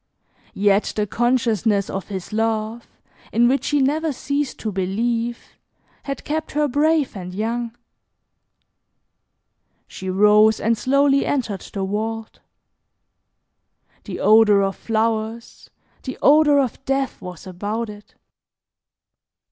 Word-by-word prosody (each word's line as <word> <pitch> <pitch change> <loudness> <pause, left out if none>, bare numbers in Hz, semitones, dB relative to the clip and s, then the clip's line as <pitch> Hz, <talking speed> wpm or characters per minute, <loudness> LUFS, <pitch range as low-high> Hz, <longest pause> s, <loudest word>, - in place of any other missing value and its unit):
Yet 200 +1 +2
the 210 - 0
consciousness 225 -3 +1
of 195 - -5
his 190 -1 -6
love, 225 +1 -1 0.4
in 240 +1 +4
which 270 +3 +1
she 295 - +1
never 310 +4 0
ceased 280 +1 -3
to 220 - -2
believe, 230 +5 -2 0.5
had 275 -1 -6
kept 310 +1 -3
her 300 0 +2
brave 295 0 +1
and 180 -1 -7
young. 230 +2 -3 2.1
She 190 - -7
rose 210 +3 +5
and 230 +1 +1
slowly 275 +3 +2
entered 225 -9 -2
the 195 -1 -3
vault. 220 +3 -4 1.7
The - - -6
odor 210 -2 +5
of 195 0 -1
flowers, 225 0 -2 0.3
the 260 - -6
odor 295 0 +6
of 265 -1 -2
death 270 0 -1
was 180 -1 -9
about 205 +5 -4
it. 210 -1 -12
225 Hz, 115 wpm, -21 LUFS, 210-265 Hz, 2.1 s, odor